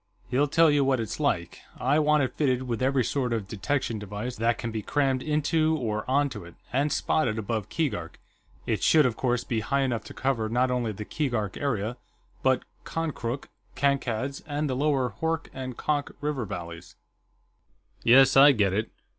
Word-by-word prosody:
He'll 140 +4 +3
tell 160 +2 +5
you 145 -1 +3
what 135 -2 +2
it's 110 -3 -4
like. - - -1 0.2
I 140 +4 +2
want 150 -1 +3
it 130 - -2
fitted 130 -4 +1
with 120 -2 -3
every 135 0 +2
sort 125 +1 -1
of 110 -4 -2
detection 115 +2 -2
device 105 +4 -5
that 115 +1 +1
can 115 - -4
be 110 -1 -3
crammed 135 +2 0
into 155 +2 +1
or 110 -3 -3
onto 140 -5 +1
it, 85 0 -13 0.2
and 140 +3 +1
spotted 120 -8 +1
above 110 -1 -3
Keegark. 105 - -3 0.5
It - - -1
should, 155 -3 +5
of 120 -3 +1
course, 125 -2 0
be 115 - -1
high 135 +6 0
enough 120 -5 -1
to - - -10
cover 120 -5 0
not 125 +2 +1
only 120 -3 0
the 105 +1 -7
Keegark 120 -10 -2
area, 120 -4 -2 0.4
but 130 -1 +2 0.2
Konkrook, 140 -6 -3 0.3
Kankad's, 135 -1 0
and 150 0 -1
the 130 - -1
lower 135 -3 +1
Hoork 165 0 -1
and 130 -2 -6
Konk 145 -2 -1
river 145 -5 -2
valleys." 85 -4 -8 1.1
"Yes, 130 +3 +6
I 140 +1 +8
get 100 -5 +2
it." 110 +3 -1
130 Hz, 180 wpm, -27 LUFS, 110-145 Hz, 1.1 s, I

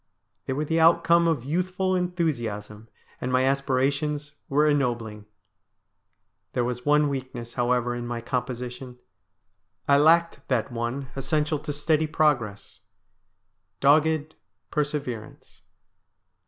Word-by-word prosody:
They 130 - 0
were 150 +3 -2
the 160 +2 +1
outcome 170 +1 +5
of 150 -7 0
youthful 185 +4 0
enthusiasm, 120 - -3 0.3
and 125 - -2
my 130 0 +3
aspirations 140 +2 0 0.2
were 150 +2 +3
ennobling. 120 -7 -1 1.3
There 125 - +1
was 125 +2 -4
one 150 0 +4
weakness, 130 -4 -5
however, 125 -1 +1
in 120 0 -5
my 120 -1 -3
composition. 125 +1 -4 0.9
I 140 - +6
lacked 165 +3 +4
that 125 0 0
one 120 +3 -4
essential 150 +3 0
to 150 - -5
steady 155 +2 +1
progress 130 -10 0 0.5
— 95 0 -50
dogged 155 +2 +3 0.4
perseverance. 145 -7 -4
135 Hz, 115 wpm, -25 LUFS, 120-150 Hz, 1.3 s, I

